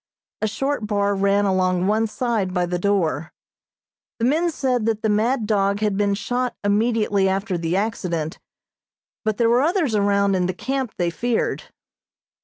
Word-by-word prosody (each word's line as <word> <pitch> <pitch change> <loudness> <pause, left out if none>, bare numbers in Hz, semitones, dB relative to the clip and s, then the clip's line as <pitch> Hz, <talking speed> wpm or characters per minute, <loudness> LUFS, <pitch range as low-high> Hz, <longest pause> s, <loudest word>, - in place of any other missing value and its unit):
A 215 - +1
short 270 +1 -2
bar 205 -1 +1
ran 200 +1 +2
along 185 -2 +1
one 215 +3 +2
side 215 -5 -2
by 180 0 +2
the 175 0 -2
door. 175 -5 0 0.9
The 230 - 0
men 320 +7 +2
said 255 -7 -1
that 220 -1 -1
the 220 - +2
mad 220 +3 +1
dog 200 -1 +1
had 210 -2 +1
been 200 0 +1
shot 245 +3 -2
immediately 205 -2 +2
after 195 0 -1
the 170 0 -1
accident, 180 -7 -2 0.8
but 215 -2 -1
there 235 - +3
were 240 +2 +4
others 320 - +1
around 200 -1 +2
in 180 -1 +1
the 185 - -3
camp, 265 +1 -3
they 175 -1 0
feared. 235 +6 -1
205 Hz, 165 wpm, -22 LUFS, 195-230 Hz, 0.9 s, were